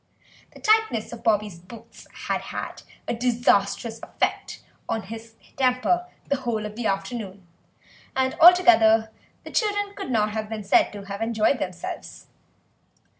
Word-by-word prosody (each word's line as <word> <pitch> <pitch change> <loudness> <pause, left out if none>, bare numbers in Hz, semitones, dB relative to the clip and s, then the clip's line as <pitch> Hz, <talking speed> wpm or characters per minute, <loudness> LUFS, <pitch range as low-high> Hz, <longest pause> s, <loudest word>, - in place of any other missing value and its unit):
The - - -12
tightness 430 - +2
of 235 - -9
Bobby's 210 -5 +1
boots 200 +6 -14 0.2
had - - -1
had - - -6 0.4
disastrous 230 -2 +1
effect - - -3 0.3
on 225 - -1
his 225 +3 -10 0.2
temper 265 +8 +1 0.2
the 280 - +1
whole 235 -4 -2
of 210 0 -7
the 235 -1 -2
afternoon, 195 -1 -4 0.7
and 260 0 +1
altogether 230 -12 +7 0.3
the - - -10
children 410 -2 0
could 390 - -6
not 215 -3 +1
have 215 0 -4
been 220 -1 -5
said 195 - +3
to 205 -1 -8
have 200 +1 -6
enjoyed 225 +3 +1
themselves. 180 -2 -6
225 Hz, 135 wpm, -24 LUFS, 210-260 Hz, 0.7 s, altogether